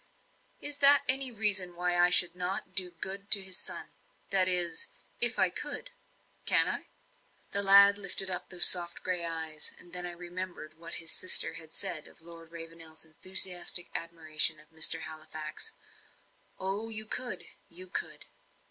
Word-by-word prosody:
"Is 290 0 -4
that 285 0 +7
any 265 0 +2
reason 200 -5 0
why 180 0 -2
I 175 0 +3
should 180 -1 +4
not 180 +2 -6
do 185 -2 0
good 195 +4 -7
to 200 -2 +3
his 190 -1 -2
son - - -3 0.4
that 190 -2 +2
is, 180 - +3 0.3
if - - +6
I - - +2
could? - - -4 0.6
Can - - +4
I?" - - -4 0.6
The 200 - +2
lad 200 +1 +5
lifted 195 -1 -4
up 180 -1 -5
those 180 - +7
soft 175 -1 +5
grey 180 -2 -2
eyes, 160 -2 -3
and 175 - -12
then 180 0 -4
I - - -6
remembered 175 -2 -9
what 170 0 -5
his 165 -1 -4
sister 185 - +3
had 160 -1 -10
said 175 -5 -3
of - - -20
Lord 165 0 -14
Ravenel's 165 -1 -10
enthusiastic 175 +2 +1
admiration 160 -1 -2
of 155 +1 -22
Mr. 160 +1 +3
Halifax. 155 - -7 0.9
"Oh, 195 +4 -5
you 215 -1 -2
could 245 +3 -5 0.3
you 180 +2 -7
could." 185 - -6
180 Hz, 160 wpm, -28 LUFS, 165-195 Hz, 0.9 s, that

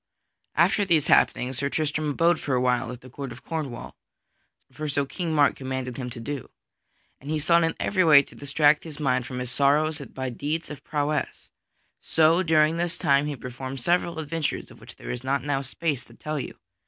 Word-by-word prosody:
_ - - -62 0.5
After 205 - +3
these 165 -6 +3
happenings, 125 +1 +3
Sir 140 - 0
Tristram 155 0 -1
abode 165 +3 +2
for 135 - -1
awhile 125 -1 +1
at 125 0 -9
the 130 - -13
Court 135 -1 -6
of 115 - -11
Cornwall, 150 -7 -5 0.8
for 155 0 -5
so 140 0 0
King 170 +4 -4
Mark 145 -2 +4
commanded 130 -2 -4
him 125 -2 -4
to 120 - -8
do. 140 +2 -5 0.7
And 140 - -10
he 155 - 0
sought 170 +3 +4
in 165 - 0
every 190 -2 +2
way 150 -4 +7
to - - -16
distract 145 +1 +2
his 155 -3 -9
mind 130 -4 0
from 125 - -6
his 125 -1 -3
sorrows 150 +4 +2
by 130 -2 -5
deeds 150 +7 -3
of 145 - -9
prowess. 150 0 -2 0.5
So 160 +2 +3
during 160 -2 +3
this 175 0 -1
time 140 +1 +3
he 150 - -3
performed 130 +1 -6
several 170 +4 +1
adventures 160 0 -3
of - - -15
which - - -11
there - - -7
is 125 0 -5
not 135 +1 0
now 140 -1 0
space 140 0 -2
to - - -18
tell 155 -1 -4
you. 130 - -7
145 Hz, 205 wpm, -25 LUFS, 130-155 Hz, 0.8 s, way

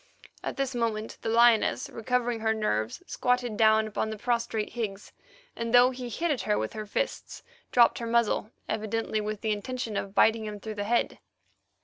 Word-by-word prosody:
At - - -4
this 270 -1 -1
moment 225 -2 -2
the 225 - -2
lioness, 235 -1 +4
recovering 245 0 -1
her 220 0 +1
nerves, 110 - -1
squatted 250 -3 0
down 220 0 +3
on 220 - 0
the 220 - -5
prostrate 235 -2 -1
Higgs, 210 -4 -5 0.4
and 230 +1 0
though 245 +1 +7
he 250 -1 -6
hit 335 +8 -1
at 275 - -1
her 105 - +1
with 110 0 -3
his 215 -1 -6
fists, - - -3 0.3
dropped 240 -2 +5
her 235 - -4
muzzle, 230 -2 +1 0.2
evidently 220 0 -1
with 210 0 -4
the 220 - 0
intention 225 +1 -3
of 195 0 -4
biting 220 0 +4
him 210 -1 -6
through 215 +1 -6
the 205 -1 -4
head. 235 +3 0
225 Hz, 185 wpm, -28 LUFS, 215-240 Hz, 0.4 s, though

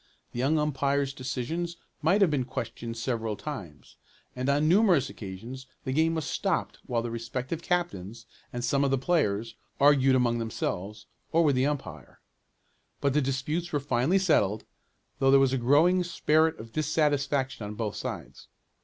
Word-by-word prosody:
The 120 - -6
young 140 +5 +2
umpire's 140 -2 0
decisions 140 +7 -3 0.2
might 180 +7 +3
have 185 -5 +5
been 140 -3 +1
questioned 115 -2 -5
several 115 -2 -2
times, 100 - -8 0.4
and 130 +2 -2
on 145 +2 +3
numerous 175 - +4
occasions 115 +7 -8 0.2
the 130 - -2
game 160 +3 +2
was 160 -3 -2
stopped - - -1
while 115 -1 0
the 120 - -4
respective 125 +7 -4
captains, 120 - -2 0.3
and 120 0 -3
some 140 +3 +2
of 140 - +2
the 135 - +2
players, 115 - 0 0.3
argued 135 -2 +5
among 120 -2 +2
themselves, 105 -2 -4 0.3
or 165 +1 +4
with 145 -4 +3
the 130 +2 +2
umpire. 145 -2 -5 0.8
But 140 -1 +1
the 150 - +3
disputes 145 +6 -2
were 145 - +1
finally 140 +5 +1
settled, 110 - +2 0.5
though 135 - +3
there 135 0 +7
was 135 -1 +3
a 135 - +1
growing 160 +9 +4
spirit 160 -2 +2
of 115 +1 -10
dissatisfaction 145 -4 0
on 105 +1 -6
both 105 -2 -3
sides. - - -7
135 Hz, 160 wpm, -28 LUFS, 120-155 Hz, 0.8 s, there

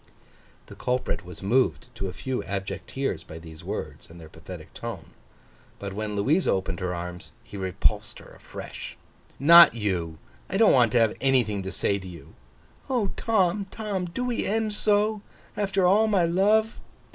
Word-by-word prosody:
The - - -12
culprit 125 0 -2
was 90 0 -11
moved 125 +3 +2
to 100 -4 -4
a - - -4
few 130 +6 -4
abject 95 -1 -4
tears 135 0 -2
by 80 - -10
these 80 -1 -11
words - - -6
and 85 +1 -13
their 80 -1 -12
pathetic 80 +1 -11
tone. - - -7 0.7
But, 100 -1 -6
when 105 +1 -4
Louisa 145 - +2
opened 95 -2 -1
her 90 -1 -2
arms, 90 0 -7
he - - -12
repulsed 100 +2 -1
her - - -14
afresh. - - -9 0.4
'Not 170 +1 +8
you. 90 -7 -2 0.3
I 195 - -1
don't 220 0 +6
want 120 -4 +4
to 120 - +5
have 115 -2 +3
anything 125 -7 +2
to 95 0 -5
say 100 - 0
to 95 - -10
you!' 85 -3 -12 0.6
'O 240 -7 0
Tom, 200 -3 +1
Tom, 205 -4 -3
do 185 +9 -4
we 245 -2 -1
end 220 0 -1
so, 210 0 +1 0.3
after 195 -2 +1
all 205 +5 +5
my 195 -5 +3
love! 210 +6 +2
125 Hz, 170 wpm, -26 LUFS, -, 0.7 s, Not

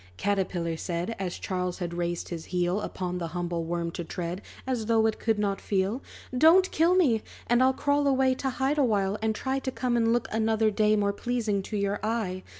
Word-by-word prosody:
Caterpillar 185 -4 -1
said, 175 +6 -3
As 185 -2 -3
Charles 180 -1 -3
had 175 -2 -4
raised 175 0 -2
his 165 -2 -5
heel 180 +2 0
Upon 180 -3 -4
the 170 - -3
humble 170 -1 -2
worm 170 0 -2
to 175 - -5
tread, 175 +2 -4 0.2
As 245 -4 -2
though 225 -1 +3
it 220 - 0
could 225 -1 +1
not 200 -1 -1
feel. 200 +5 0 0.3
"Don't 335 +8 +6
kill 335 +3 +3
me! 260 -12 +3 0.2
and 240 +1 +3
I'll 260 0 +5
crawl 285 +1 +1
away 265 -1 +3
To 265 +1 -2
hide 265 +3 0
awhile, 205 -6 +1
and 220 0 0
try 265 +3 -1
To 265 - -3
come 250 -1 -1
and 230 -1 +3
look, 240 0 +1
another 220 0 +2
day, 215 0 +3
More 200 -1 +1
pleasing 220 -3 -1
to 210 +2 -4
your 200 0 0
eye. 215 -5 -1
210 Hz, 205 wpm, -27 LUFS, 180-245 Hz, 0.3 s, Don't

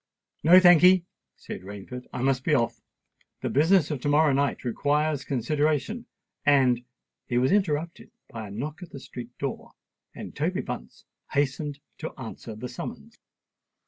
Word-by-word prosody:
"No, 175 +4 +9
thank'ee," 180 0 +7 0.3
said - - -8
Rainford. 100 +6 -8
"I 125 - -4
must 130 -1 +1
be 150 - +3
off. 120 -3 0 0.6
The - - -1
business 160 +3 +4
of 140 -4 -3
to 145 - 0
morrow 150 0 +4
night 140 +1 0
requires 145 +4 0
consideration; 150 - -1 0.4
and——" 130 -4 +4 0.4
He 120 - 0
was 130 +5 +3
interrupted 170 -5 0 0.2
by 110 -2 -7
a - - -10
knock 145 - -5
at 180 - -9
the 140 - -9
street 125 -2 -9
door; 140 -2 -5 0.4
and - - -8
Toby - - -1
Bunce - - -8 0.3
hastened 145 +1 -1 0.2
to 160 - -7
answer 115 -2 -7
the 110 +4 -6
summons. 125 - -8
145 Hz, 150 wpm, -26 LUFS, 125-155 Hz, 0.6 s, No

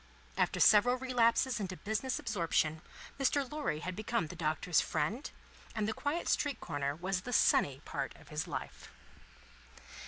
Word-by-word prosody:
After - - +1
several 245 +4 +6
relapses 250 -1 +2
into 185 -3 -4
business 220 +5 -2
absorption, 160 -3 0 0.4
Mr. 275 0 +2
Lorry 290 - -2
had 185 0 -4
become 215 -2 -1
the 170 - -8
Doctor's 160 0 +1
friend, 190 - -2 0.5
and 215 -2 0
the 220 - 0
quiet 290 +8 -2
street 290 -2 +1
corner 140 0 -2
was 185 +3 -2
the 250 - -6
sunny 140 - +3
part 140 -2 -4
of - - -17
his 150 +1 -3
life. - - -6
205 Hz, 150 wpm, -33 LUFS, 155-250 Hz, 0.5 s, several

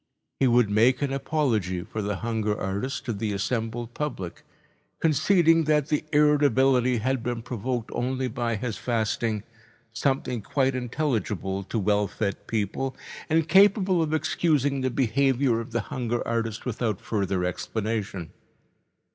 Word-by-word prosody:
He 135 - +4
would 120 -3 +4
make 120 +7 +3
an 135 -1 -1
apology 120 - 0
for 110 - -5
the 105 0 -2
hunger 110 -1 -1
artist 100 +8 -3
to 120 - -1
the 105 0 -2
assembled 115 +3 -2
public, 120 - -4 0.6
conceding 165 +1 +4
that 150 -1 +2
the 150 - +1
irritability 135 -4 +4
had 130 +3 0
been 120 -1 -3
provoked 120 0 -3
only 130 +2 -1
by 120 -1 -2
his 110 +1 -3
fasting, 110 -2 -1 0.5
something 125 -1 -1
quite 135 +5 +1
intelligible 115 - -2
to 115 - -3
well 105 0 +2
fed 100 0 -4
people 115 +5 -2 0.3
and 160 0 +2
capable 190 0 +5
of 155 -1 -1
excusing 145 -3 +1
the 130 - +1
behaviour 130 0 +2
of 115 - -6
the 120 0 0
hunger 120 +3 -3
artist 115 -1 -2
without 115 -4 -1
further 95 -4 -1
explanation. 100 -1 -3
120 Hz, 140 wpm, -26 LUFS, 110-135 Hz, 0.6 s, capable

